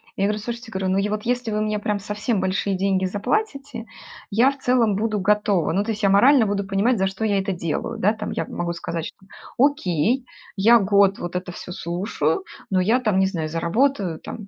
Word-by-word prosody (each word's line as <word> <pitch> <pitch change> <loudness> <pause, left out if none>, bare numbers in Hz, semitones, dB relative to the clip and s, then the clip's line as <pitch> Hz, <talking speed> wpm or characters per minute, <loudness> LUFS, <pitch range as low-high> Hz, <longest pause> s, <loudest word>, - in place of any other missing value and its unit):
Я 195 - 0
говорю:"Слушайте"- 225 +3 -4
говорю- 190 -1 -2
"Ну, - - +1
е 205 +1 0
вот 215 0 -2
если 245 -1 -1
вы 215 0 0
мне 215 0 -1
прям 210 0 -2
совсем 210 +2 -2
большие 190 +1 0
деньги 190 0 +1
заплатите, 275 - -2 0.5
я 235 +6 +4
в 280 - -11
целом 245 -5 +2
буду 215 +1 -1
готова. 205 -2 +1
Ну 200 - +1
то 225 - -2
есть 210 - -5
я 200 - +3
морально 235 +4 +5
буду 200 0 -1
понимать, 200 +5 +1
за 190 - +1
что 195 +3 -5
я 205 -2 +2
это 195 0 -2
делаю, 170 -4 -3
да, 210 +4 +3
там". 220 - -5
Я - - -2
могу 170 0 -3
сказать, 165 -1 -4
что: 190 - -11 0.3
"Окей, 250 - +2 0.3
я 225 +4 +6
год 200 -1 +3
вот 175 +1 -6
это 180 0 -3
всё 180 - -9
слушаю, 170 -3 -2 0.3
но 185 -1 +3
я 225 +7 +3
там, 215 -6 +1
не 190 - +3
знаю, 165 -5 -3
заработаю 175 - 0
там, 210 -3 -8
205 Hz, 210 wpm, -22 LUFS, 190-225 Hz, 0.5 s, я